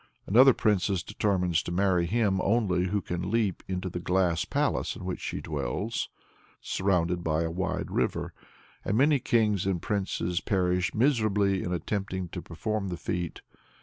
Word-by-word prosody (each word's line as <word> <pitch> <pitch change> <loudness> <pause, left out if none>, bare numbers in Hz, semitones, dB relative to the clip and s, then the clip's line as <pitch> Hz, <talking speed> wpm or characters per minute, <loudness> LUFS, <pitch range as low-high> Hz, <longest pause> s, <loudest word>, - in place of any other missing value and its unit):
Another 125 +5 +6
princess 100 -3 +1
determines 95 -5 0
to - - -6
marry 90 -1 +2
him 100 -2 +1
only 95 -5 +1
who 100 +2 0
can 90 +2 -3
leap 110 -4 0
into 95 0 -3
the 90 -1 -4
glass 90 -2 +1
palace - - 0
in - - -8
which 90 - -3
she - - -4
dwells, 105 - -3 0.5
surrounded 90 -2 0
by 80 0 +1
a 80 - -2
wide 95 +2 -2
river; - - -1 0.5
and 105 - 0
many 140 +2 +4
kings 105 -6 +1
and 95 -3 0
princes 90 -3 -1
perish 90 -3 0
miserably 105 -6 +2
in 90 - -3
attempting 95 0 -3
to 90 - -6
perform 100 +5 -3
the 90 -2 -4
feat. 85 0 -4
95 Hz, 155 wpm, -28 LUFS, 90-105 Hz, 0.5 s, Another